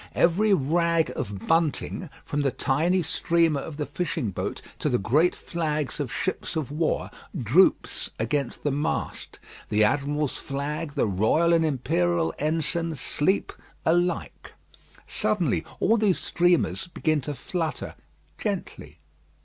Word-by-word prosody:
Every 195 +6 +3
rag 170 0 +2
of 100 0 -5
bunting, 165 +1 0 0.2
from 145 - -1
the 140 - +2
tiny 160 +8 +1
streamer 165 -2 +2
of 150 0 -7
the 150 - -2
fishing 150 - -2
boat - - -3 0.2
to 150 - 0
the 125 - +2
great 150 - +3
flag 155 -4 -2
of 140 -5 -2
ships 180 +5 -2
of 150 -4 -2
war, 155 +2 -1 0.3
droops 135 - +3
against 120 +4 -2
the 145 - +1
mast. 145 +3 -3 0.3
The 105 +1 +4
admiral's 145 +5 +1
flag, 145 +3 -4
the - - +1
Royal 110 - +3
and 165 -1 +4
Imperial 90 - +1
ensigns 160 +1 -1
sleep 185 +10 0 0.3
alike. 175 +1 0 0.5
Suddenly 185 -6 0 0.2
all 225 +4 +4
these 210 -4 +3
streamers 175 +1 +1
begin 155 -3 0
to 145 +2 -4
flutter 160 +4 -3 0.5
gently. - - -4
155 Hz, 130 wpm, -26 LUFS, 135-170 Hz, 0.5 s, The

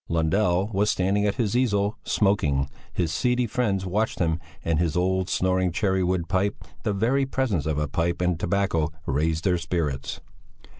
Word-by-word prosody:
Lundell 90 +4 +1
was 105 +2 +2
standing 100 +3 +1
at 100 - 0
his 115 -4 0
easel, 105 -4 +1
smoking; 75 -10 +1 0.2
his 85 -3 -1
seedy 125 +6 +1
friends 105 -5 0
watched 105 +4 -1
him 80 -1 +1 0.3
and 80 -2 +1
his 85 -1 0
old, 95 +1 +1
snoring 95 -1 +1
cherry 95 +1 +1
wood 90 -2 0
pipe; 100 +4 +1 0.3
the 105 - -1
very 125 +7 +1
presence 110 - -1
of 80 -2 0
a 75 0 0
pipe 85 +4 -1
and 90 -2 0
tobacco 85 -4 0
raised 80 +4 0
their 90 -3 +2
spirits. 80 -5 -2
95 Hz, 165 wpm, -25 LUFS, 85-105 Hz, 0.3 s, was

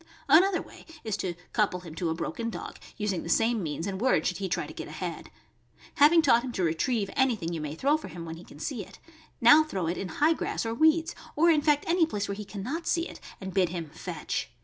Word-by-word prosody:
Another 370 +3 +5
way - - -14 0.2
is 220 -3 -1
to 175 -2 -3 0.2
couple 195 -4 +1
him 170 -3 -10
to 165 +1 -2
a 160 - -1
broken 205 +7 -3
dog, - - -7 0.2
using 205 -4 -1
the - - -7
same 225 +4 +2
means 160 -1 -3
and 195 0 -4
word 260 - +3
should 180 - 0
he 190 -1 -3
try - - -1
to - - -10
get - - -7
ahead. - - -6 0.7
Having 320 +2 +6
taught 240 -4 +5
him 260 - -4
to 190 - -1
retrieve 195 +6 0
anything 225 -11 +1
you 165 - -3
may 150 0 -4
throw 285 - +2
for 310 - -9
him 170 -1 -8
when 165 0 -7
he 170 - -11
can - - -14
see 215 - -4
it, - - -15 0.4
now 295 +7 +8
throw 195 - -3
it 170 +2 -2
in 195 - -3
high 305 - +3
grass 315 - -3
or 225 - -1
weeds, 320 +5 +3 0.2
or 335 +3 +5
in 305 -2 +3
fact 295 -1 +2
any 335 -1 +3
place 205 -9 -3
where 200 - -2
he 210 +1 -6
can 195 0 -7
not 325 - -4
see 335 +1 +1
it, - - -11 0.2
and 190 -1 -6
bid 185 -3 +3
him 165 -3 -5
"fetch." 170 -5 -4
210 Hz, 250 wpm, -28 LUFS, 175-290 Hz, 0.7 s, now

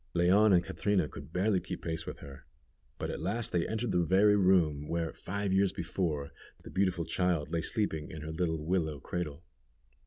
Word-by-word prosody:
Leon 95 +5 +5
and 90 -2 +5
Catrina 90 +1 0
could 80 - -10
barely 95 +2 +2
keep - - -7
pace 80 -1 -3
with - - -5
her, 70 -2 -11 0.5
but - - -3
at - - -5
last 115 +6 -1
they 85 -1 +1
entered 110 +1 -2
the 90 - +2
very 100 +5 +5
room, 85 -7 +3
where, 85 -1 -2
five 100 0 -3
years 95 0 +3
before, 85 -5 -2 0.3
the - - -10
beautiful 95 -3 +1
child 85 -2 0
lay 85 - 0
sleeping 80 -5 -1
in 80 -1 -7
her 80 - -5
little 80 0 -1
willow 80 -4 0
cradle. 85 +1 -4
90 Hz, 185 wpm, -31 LUFS, 80-95 Hz, 0.5 s, Leon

